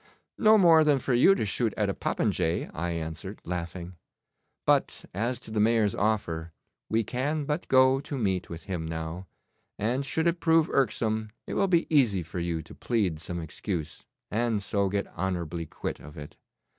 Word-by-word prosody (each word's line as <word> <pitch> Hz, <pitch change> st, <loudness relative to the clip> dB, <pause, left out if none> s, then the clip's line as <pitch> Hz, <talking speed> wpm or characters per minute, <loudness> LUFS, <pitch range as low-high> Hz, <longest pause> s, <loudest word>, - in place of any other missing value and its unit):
'No 220 Hz, 0 st, +7 dB
more 165 Hz, -5 st, +7 dB
than 150 Hz, -2 st, +4 dB
for 130 Hz, 0 st, -1 dB
you 135 Hz, +11 st, +6 dB
to 110 Hz, -, -1 dB
shoot 110 Hz, +2 st, -1 dB
at 105 Hz, -, +1 dB
a 100 Hz, -, 0 dB
popinjay,' 80 Hz, -2 st, -1 dB
I 85 Hz, +3 st, -2 dB
answered, 80 Hz, -1 st, -5 dB
laughing; 85 Hz, 0 st, -5 dB, 0.7 s
'but -, -, +2 dB
as 115 Hz, +6 st, -1 dB
to -, -, -10 dB
the 110 Hz, -, -1 dB
Mayor's 110 Hz, -1 st, +3 dB
offer, 85 Hz, -7 st, -1 dB, 0.4 s
we 115 Hz, +1 st, +2 dB
can 145 Hz, +7 st, -2 dB
but 150 Hz, +3 st, -2 dB
go 130 Hz, 0 st, +5 dB
to 145 Hz, 0 st, -5 dB
meat 95 Hz, -6 st, -1 dB
with 85 Hz, -1 st, -7 dB
him 90 Hz, -3 st, -4 dB
now, 80 Hz, +3 st, -5 dB, 0.5 s
and 120 Hz, +6 st, 0 dB
should 160 Hz, +4 st, 0 dB
it 170 Hz, 0 st, +1 dB
prove 165 Hz, -1 st, +3 dB
irksome 110 Hz, -5 st, +1 dB, 0.2 s
it -, -, -5 dB
will 195 Hz, -, +2 dB
be 170 Hz, -3 st, +3 dB
easy 105 Hz, -, +4 dB
for 80 Hz, +2 st, -6 dB
you 85 Hz, -2 st, -2 dB
to 80 Hz, -, -13 dB
plead 100 Hz, -10 st, -1 dB
some 85 Hz, +1 st, -5 dB
excuse, 80 Hz, -1 st, -5 dB, 0.3 s
and 110 Hz, -1 st, 0 dB
so 100 Hz, -1 st, 0 dB
get 100 Hz, +1 st, -1 dB
honourably 85 Hz, -2 st, -3 dB
quit -, -, -5 dB
of 75 Hz, +3 st, -12 dB
it. 75 Hz, -1 st, -9 dB
105 Hz, 180 wpm, -28 LUFS, 85-130 Hz, 0.7 s, No